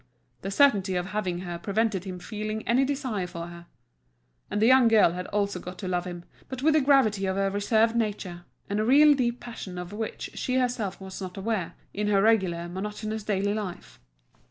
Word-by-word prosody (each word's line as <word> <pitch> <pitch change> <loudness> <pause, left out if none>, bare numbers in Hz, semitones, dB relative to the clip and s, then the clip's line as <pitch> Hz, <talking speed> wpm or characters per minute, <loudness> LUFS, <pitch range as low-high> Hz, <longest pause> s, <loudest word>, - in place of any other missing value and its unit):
The 195 - -4
certainty 200 -5 +3
of 180 0 -1
having 185 -4 -2
her 175 -2 -5
prevented 205 -1 0
him 185 -1 -5
feeling 215 +3 -5
any 245 +3 +4
desire 260 -9 -2
for 170 -1 -6
her. 170 0 -11 0.8
And 205 - -1
the 220 - +4
young 255 0 +6
girl 220 -6 +5
had 180 +1 -5
also 200 -2 -1
got 180 +1 -8
to 195 - -5
love 180 -1 -1
him, 175 -1 -7 0.2
but 260 0 -6
with 315 +1 +5
the 310 - +4
gravity 225 -8 +3
of 190 - 0
her 195 0 +1
reserved 220 +3 +2
nature, 200 -6 -2 0.2
and 205 +1 -1
a - - +2
real 290 +6 +7
deep 245 -3 0
passion 200 -6 -8
of 180 +2 -6
which 220 +1 -5
she 255 - -2
herself 245 -6 -1
was 190 0 -8
not 185 0 -6
aware, 195 -3 -2 0.2
in 210 +1 -1
her 200 -1 +3
regular, 190 -6 +2
monotonous 210 +4 -4
daily 205 0 0
life. 205 -5 -6
205 Hz, 200 wpm, -27 LUFS, 185-225 Hz, 0.8 s, real